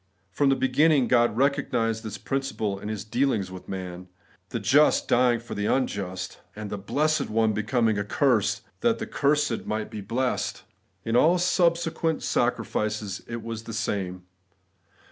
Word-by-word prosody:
5). - - -36
From 145 -1 +4
the 135 - +4
beginning 130 +1 +3
God 120 -3 +3
recognised 125 -5 +1
this 110 -1 -5
principle 135 -7 -2
in 105 - -6
His 105 -2 -4
dealings 110 -3 0
with 95 -1 -10
man; 90 -1 -6 0.4
the - - -3
Just 150 +2 +4
dying 120 -1 +3
for 120 - -8
the 105 - -2
imjust; 95 -8 -2 0.2
the 105 -1 -5
blessed 155 +10 0
One 110 0 +2
becoming 110 0 +1
a - - 0
curse 110 -2 +1 0.2
that 235 -1 +2
the - - -4
cursed 145 -4 0
might 110 0 -3
be 110 -2 -6
blessed. 125 +6 -2 0.4
In 115 - 0
all 160 +8 +5
subsequent 170 -2 +1
sacri - - +1
fices 105 -2 -3
it 115 -1 -5
was 115 -1 -6
the 115 - -6
same. 95 -5 -3
115 Hz, 160 wpm, -26 LUFS, 105-135 Hz, 0.4 s, all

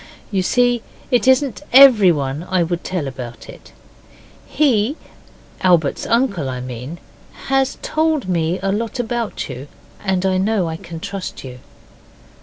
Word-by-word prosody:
You 195 -2 +1
see 245 +4 +2 0.3
it 250 0 +2
isn't 260 -2 +3
everyone 185 - +6
I 185 -2 +2
would 170 +1 -3
tell 180 -6 -3
about 125 -3 -8
it. - - -13 0.8
He, 265 -1 +1 0.6
Albert's 170 -6 +2
uncle, 230 - +1
I 125 -1 -4
mean, 125 +5 -7 0.5
has 270 -1 +1
told 310 -7 0
me 170 -1 0
a 195 - +1
lot 225 +4 -2
about 235 -2 -3
you, 130 +4 -8 0.4
and 190 -2 0
I 190 -1 +2
know 200 -2 +1
I 160 0 -4
can 165 0 -9
trust 200 -1 -6
you. 125 -1 -9
190 Hz, 140 wpm, -19 LUFS, 160-240 Hz, 0.8 s, everyone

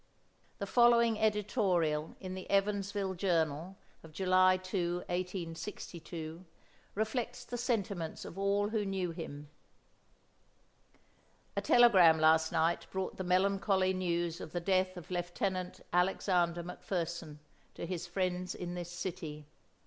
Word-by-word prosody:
The 200 - -3
following 235 0 +4
editorial 195 -8 +1
in 185 -1 -6
the 185 0 -7
"Evansville 200 -1 0
Journal" 170 -1 0 0.2
of 160 - -13
July 185 +2 +4
2, 180 -1 -2
1862, 170 -2 -5 0.5
reflects 220 +3 -2
the 245 - -5
sentiments 200 -9 -2
of - - -8
all 200 +1 +1
who 220 -1 0
knew 190 -3 -2
him: 150 -3 -8 2.0
A - - 0
telegram 190 -10 +7
last 160 0 +4
night 165 +2 +1
brought 190 0 -3
the 190 - -3
melancholy 190 +1 +2
news 175 -2 -1
of 155 - -8
the 175 - 0
death 185 +1 +1
of 175 +1 -10
Lieutenant 180 +1 -2
Alexander 180 -1 +2
McFerson 170 -3 -4 0.4
to - - -5
his 175 0 -4
friends 180 0 -2
in 175 0 -5
this 175 -1 -5
city. 170 -4 -5
185 Hz, 120 wpm, -33 LUFS, 170-195 Hz, 2.0 s, telegram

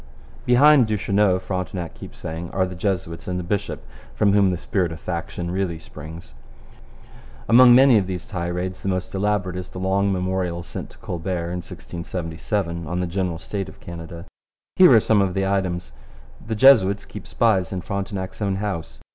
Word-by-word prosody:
Behind 135 +1 +6
Duchesneau, 100 -2 +2
Frontenac 90 -2 -4
keeps - - -11
saying, 80 +2 -6
are 95 -1 0
the 90 - -6
Jesuits 90 -3 -3
and 90 -1 -2
the 90 - -3
bishop, 100 +3 -3 0.3
from 100 -2 +3
whom 100 -2 +4
the 90 - -1
spirit 90 0 -1
of 80 - -7
faction 85 0 -4
really 95 -3 -1
springs. 80 -1 -11 1.1
Among 120 +1 +8
many 130 -3 +7
of 95 - -3
these 90 -2 -4
tirades 90 -2 -4
the 95 - -2
most 95 -1 -3
elaborate 95 -2 0
is 90 0 -6
the - - -10
long 95 +2 +1
memorial 90 -2 -1
sent - - -7
to - - -18
Colbert 85 0 -4
in 90 - -3
1677 85 0 -4
on 90 +2 -2
the 90 - 0
general 90 -1 -2
state 95 +4 -5
of - - -15
Canada. 85 0 -9 0.5
Here 185 -5 +8
are 115 - +8
some 105 -1 +3
of 95 -1 0
the 95 0 +1
items. 95 -3 -1 0.5
The 110 - -3
Jesuits 105 -6 +5
keep - - -10
spies 95 -7 +1
in 95 -2 -3
Frontenac's 100 +1 -4
own 100 -2 0
house. 95 -5 -4
95 Hz, 175 wpm, -23 LUFS, 85-100 Hz, 1.1 s, Among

